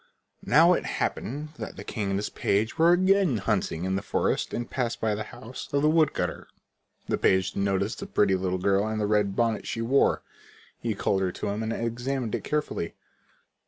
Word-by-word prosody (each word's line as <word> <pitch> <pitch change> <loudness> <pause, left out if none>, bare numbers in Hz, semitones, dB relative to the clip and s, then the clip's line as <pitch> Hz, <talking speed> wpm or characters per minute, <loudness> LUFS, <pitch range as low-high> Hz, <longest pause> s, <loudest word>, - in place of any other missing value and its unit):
Now 165 +7 +6
it - - 0
happened 145 +5 -3
that - - -6
the - - -7
king 105 -4 -3
and 95 - 0
his 105 - -3
page 110 +9 0
were 165 +1 +6
again 185 - +3
hunting 95 -5 -1
in 95 0 0
the 95 - -1
forest - - 0
and 120 0 -3
passed 120 -3 -2
by 110 -1 +1
the 105 +1 -3
house 120 +2 -9
of 140 0 +1
the 150 - +5
wood 155 -2 +3
cutter. - - -3 0.6
The - - 0
page 95 0 +2
noticed 100 +2 0
the 200 - -6
pretty 105 - +2
little 95 0 0
girl 100 +3 +2
and 110 0 -2
the 105 - +1
red 105 -2 +1
bonnet 115 -2 0
she 115 - -2
wore. 135 +4 +3 0.6
He 115 -3 -2
called 95 0 0
her 95 -1 0
to - - -3
him 105 +2 -2
and 110 0 -2
examined 120 +1 -2
it - - -2
carefully. 150 - -2
110 Hz, 200 wpm, -27 LUFS, 100-135 Hz, 0.6 s, Now